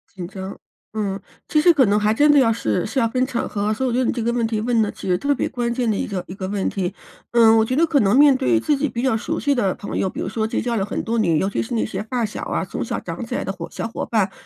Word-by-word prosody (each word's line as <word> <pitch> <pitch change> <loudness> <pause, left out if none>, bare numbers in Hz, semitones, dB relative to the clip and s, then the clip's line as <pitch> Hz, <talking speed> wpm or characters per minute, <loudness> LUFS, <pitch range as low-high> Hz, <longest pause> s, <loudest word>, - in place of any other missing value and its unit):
紧 180 -2 -6
张。 190 +1 -8 0.3
嗯， 200 -2 -2 0.3
其 305 - +2
实 350 +2 +7
可 280 -5 +4
能 205 0 +2
还 210 +1 +2
真 295 +7 +4
的 290 - +6
要 235 -4 +4
是 110 - -1
是 225 +5 -2
要 230 - +3
分 255 +3 0
场 240 -3 -2
合， 205 +1 -1
所 245 +5 -1
以 - - +1
我 235 - -2
觉 250 - +1
得 255 - +1
你 - - +2
这 235 - -3
个 235 +1 0
问 235 -2 +1
题 220 -1 -1
问 230 0 +1
的 210 - 0
其 - - -9
实 180 - +3
特 285 +4 +1
别 - - -1
关 240 -2 -2
键 240 -1 0
的 215 - +1
一 - - -2
个 190 -3 -4
一 - - -7
个 190 -1 -5
问 200 0 -1
题。 190 -1 -2 0.4
嗯， 230 -2 +6
我 - - +4
觉 255 +3 -1
得 325 +4 +4
可 310 -4 +2
能 205 +3 +3
面 285 -1 +7
对 275 +6 +2
自 300 - +1
己 290 +1 -1
比 240 +1 -4
较 260 -4 +2
熟 225 - -2
悉 285 -1 +1
的 200 -8 0
朋 205 - -5
友， 190 - +1
比 - - -8
如 - - -2
说 220 -1 -1
结 - - -2
交 240 -1 -1
了 200 - 0
很 200 - -3
多 230 +1 -1
年 170 -7 +2
尤 190 - +1
其 200 - -1
是 240 +2 -4
那 225 - +1
些 195 -2 -4
发 235 +2 -2
小 210 - -6
啊， - - -2
从 - - -4
小 - - -3
长 - - -6
起 - - -4
来 - - -2
的 - - -2
伙 - - -7
小 - - -4
伙 230 - -5
伴， 200 -4 +1
225 Hz, 355 characters per minute, -21 LUFS, 205-255 Hz, 0.4 s, 实